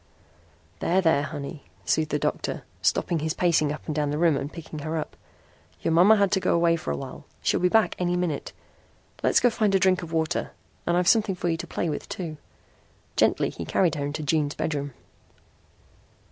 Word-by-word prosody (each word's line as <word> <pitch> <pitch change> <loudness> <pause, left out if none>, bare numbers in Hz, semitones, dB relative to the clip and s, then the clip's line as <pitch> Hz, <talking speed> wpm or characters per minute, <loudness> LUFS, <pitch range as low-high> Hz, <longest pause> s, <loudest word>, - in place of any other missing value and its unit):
"There, 180 +3 +2
there, 160 -6 +3
honey," 145 0 -6 0.2
soothed 155 - +1
the 150 - +1
doctor, - - -2 0.2
stopping 170 - +1
his 155 +1 -2
pacing 160 -4 +2
up 150 - -7
and 155 - -3
down 150 -1 0
the 145 - -1
room 165 -2 +3
and 140 +2 -3
picking 160 -2 -8
her 155 +2 -3
up. 155 - -5 0.7
"Your - - +1
mama 180 +7 +7
had 200 -2 +2
to 190 - +3
go - - +1
away 170 0 +3
for 165 - -5
awhile. 70 -1 -5 0.2
She'll - - +2
be 180 - +3
back 220 +3 +3
any 180 0 +1
minute. 170 -5 -2 0.7
Let's - - +4
go 245 - +3
find 215 -3 +1
a - - +4
drink 185 -1 +3
of 165 -2 -8
water. 160 -1 -1 0.3
And 170 0 +2
I've 180 0 +1
something 210 -2 +4
for 175 -1 -2
you 165 - 0
to - - -6
play 175 - -2
with 150 - -4
too." 165 -4 -5 0.8
Gently - - +2
he - - -6
carried 175 -5 +2
her 145 - -3
into 150 +2 -4
June's 150 -1 0
bedroom. 145 -3 -2
165 Hz, 200 wpm, -26 LUFS, 150-180 Hz, 0.8 s, mama